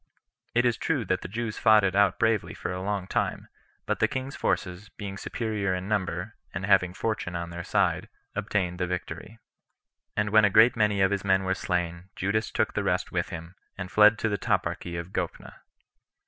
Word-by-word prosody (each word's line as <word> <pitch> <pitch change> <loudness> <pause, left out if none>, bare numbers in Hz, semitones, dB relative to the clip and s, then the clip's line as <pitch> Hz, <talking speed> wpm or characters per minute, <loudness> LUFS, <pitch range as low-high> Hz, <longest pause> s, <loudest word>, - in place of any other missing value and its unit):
It 120 +1 +4
is 120 -2 +2
true 145 -8 0
that 95 0 0
the - - -6
Jews 110 +2 -4
fought 110 -1 +6
it 95 -1 +1
out 100 -2 +4
bravely 115 -3 +1
for - - -4
a 90 - -4
long 100 -1 -2
time, - - -2 0.4
but - - -1
the - - +4
king's 130 +1 -4
forces, 95 +2 -2
being 100 -2 -7
superior 105 -3 -2
in 90 +1 -4
number, 95 -1 -2 0.2
and 95 +2 -2
having 95 -2 +3
fortune 110 -6 -2
on 85 0 -4
their 85 +1 -5
side, - - +1 0.3
obtained 90 -4 -1
the 90 - 0
victory. 90 +4 -5 0.8
And 105 -1 +1
when 110 0 +6
a 105 - +6
great 110 +5 +6
many 105 -3 +2
of 95 0 +4
his 100 -1 -1
men 95 -1 +3
were 95 0 +1
slain, 90 -1 -2
Judas 105 +4 0
took - - 0
the - - 0
rest - - 0
with - - -1
him, 85 +1 -7 0.2
and 90 -2 -6
fled 105 +1 +6
to 110 - 0
the 105 -2 -1
toparchy 85 -1 -1
of 85 +2 -6
Gophna. - - -4
100 Hz, 200 wpm, -27 LUFS, 90-110 Hz, 0.8 s, fought